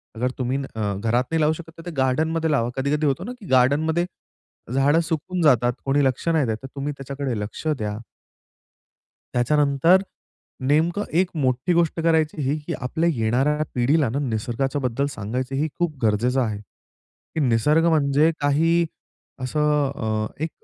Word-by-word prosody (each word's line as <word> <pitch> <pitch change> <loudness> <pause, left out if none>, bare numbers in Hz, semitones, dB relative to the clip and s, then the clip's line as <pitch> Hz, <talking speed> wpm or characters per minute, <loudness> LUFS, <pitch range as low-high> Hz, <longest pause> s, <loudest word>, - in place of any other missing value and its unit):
अगर 125 +3 -1
तुम्ही 130 +1 -1 0.2
अ, 105 -2 -1
घरात 115 +5 +1
नाही 165 - +1
लावू 155 +1 +3
शकत 165 0 -9
तर 165 - -11
ते 175 - -5
गार्डनमध्ये 160 +5 +1
लावा. 120 -5 +1
कधी-कधी 145 +3 0
होतो 140 +5 0
ना, 240 - -5
की 210 - -12
गार्डनमध्ये 150 +7 +3 0.7
झाडं 140 +4 +3
सुकून 175 +3 -2
जातात 125 -6 +4
कोणी 140 +1 +2
लक्ष 130 +4 -1
नाही 160 -4 +2
देत 110 -1 -1
तर - - -5
तुम्ही 140 +1 -3
त्याच्याकडे 135 -3 -4
लक्ष 105 +9 -6
द्या. 105 -9 -1 1.4
त्याच्यानंतर 145 +7 +3 0.7
नेमकं 165 +7 +2 0.2
एक 185 - -1
मोठी 130 +2 +1
गोष्ट 170 -1 +1
करायची 160 -2 +1
ही, 140 +2 0
की 170 - -2
आपल्या 160 +6 -1
येणाऱ्या 135 +6 +1
पिढीला 135 +3 +2
ना 130 +5 -2
निसर्गाच्या 130 +2 -2
बद्दल 125 +2 0
सांगायचं. 125 +6 -3
हे 150 +3 +1
खूप 170 -4 -1
गरजेचं 120 +5 +2
आहे, 110 -4 -1
की 105 - -13
निसर्ग 150 +5 +3
म्हणजे 150 0 +3
काही 165 +4 +2 0.6
असं 150 +1 +1
अ, 110 -1 -1 0.2
एक 160 - -1
140 Hz, 155 wpm, -23 LUFS, 125-160 Hz, 1.4 s, जातात